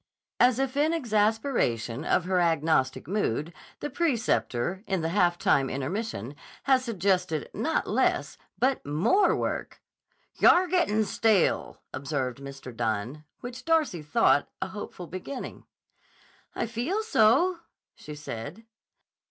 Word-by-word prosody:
As 245 -1 +5
if 270 0 -1
in 305 +3 +2
exasperation 215 - 0
of 180 - +1
her 185 0 +1
agnostic 160 -6 +1
mood, 170 - -1 0.3
the 295 - -3
preceptor, 220 - 0
in 190 -3 0
the 160 - -1
half 175 -1 +2
time 135 -5 +2
intermission, 140 - -4 0.3
had 265 -2 +4
suggested 185 - -1
not 320 - 0
less, - - +1 0.2
but 260 +1 +1
more 185 - +3
work! - - -3 0.6
"Yah'r 365 +1 +6
gettin' 325 - +2
stale," 210 -2 +1
observed 135 -3 -3
Mr. 135 -3 -9
Dunne, 115 +6 -2 0.2
which 245 +1 -7
Darcy 315 - +1
thought 145 -1 +2
a - - -3
hopeful 190 -2 -7
beginning. 185 +10 -7 0.9
"I - - -1
feel 245 - -2
so," 335 - +3 0.3
she 150 - -10
said. 150 - -7
190 Hz, 120 wpm, -27 LUFS, -, 0.9 s, Yah'r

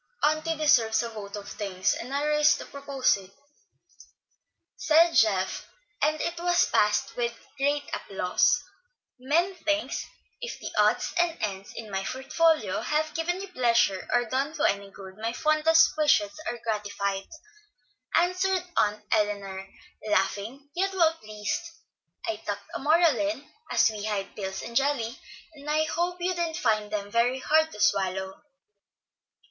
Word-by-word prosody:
"Auntie 310 +2 +1
deserves 230 -8 +3
a 235 - -4
vote 210 -3 -8
of 205 -1 -8
thanks, 195 -3 -1
and 250 - -6
I 285 +1 0
rise 300 +1 +4
to - - -8
propose 275 -4 0
it," 190 -1 -12 1.5
said 330 +2 +4
Geoff; 200 -4 +2 0.3
and 305 +1 +2
it 340 0 -2
was 350 0 +3
passed 210 0 +1
with 235 -1 -2 0.2
great 285 +1 +1
applause. 185 -2 +1 0.6
"Many 330 +9 +1
thanks. 310 -1 -1 0.3
If 485 - -6
the - - -6
odds - - +2
and 345 -1 +2
ends 195 -2 -4
in 220 -2 -8
my 195 0 -2
portfolio 305 +8 +1
have 310 +1 -1
given 350 +3 -1
you 395 - -7
pleasure 235 - +2
or 245 0 +3
done 270 +6 -2
you 300 - +1
any 200 0 0
good, 190 -1 -12
my 225 +1 -2
fondest 310 +3 +4
wishes 295 -10 +3 0.2
are 240 - -4
gratified," 205 -3 -2 0.9
answered 365 +1 +2
Aunt 210 0 +1
Elinor, 200 -2 -1 0.4
laughing, 215 +8 -1
yet 385 +2 0
well 330 -3 +4
pleased. 215 -3 -4 0.6
"I 335 -1 -2
tucked - - -6
a - - -3
moral 315 +3 +4
in, 300 -2 -2 0.2
as - - +4
we 210 -1 -6
hide 200 -2 -3
pills 190 -1 -5
in 235 - -7
jelly, 265 -3 0 0.3
and 295 0 -9
I 310 +1 +2
hope 345 +3 -1
you 360 +1 0
didn't 340 -2 -2
find 215 -8 +1
them 205 -1 -3
hard 260 +7 +2
to 210 - -11
swallow." 190 -1 0
260 Hz, 150 wpm, -27 LUFS, 210-315 Hz, 1.5 s, rise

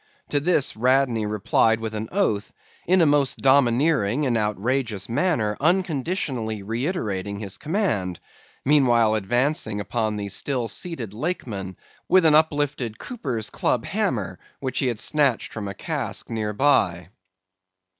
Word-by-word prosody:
To 145 - +2
this, 150 -2 +2
Radney 125 -2 +2
replied 105 +2 +2
with 110 -1 -4
an 110 +1 -4
oath, 110 - 0 0.4
in 185 +1 +4
a - - +5
most 145 -3 +2
domineering 135 -1 +3
and 125 -3 +1
outrageous 105 0 -1
manner 120 - 0
unconditionally 150 - -1
reiterating 105 - -3
his 100 -2 -4
command; 145 - -1 0.5
meanwhile 120 -6 +4
advancing 115 +1 0
upon 110 0 -2
the 100 -1 -4
still 120 +4 -1
seated 120 - -5
Lakeman, 105 - -4 0.3
with 185 -2 +5
an 155 - +6
uplifted 145 -7 +1
cooper's 130 - -4
club - - 0
hammer - - -2 0.2
which 130 -2 -2
he 135 - +1
had 120 -4 -2
snatched 140 -5 +1
from 105 -2 -5
a 100 - -6
cask 140 -4 -3
near 110 -2 -2
by. 100 -9 +2
120 Hz, 135 wpm, -23 LUFS, 105-145 Hz, 0.5 s, an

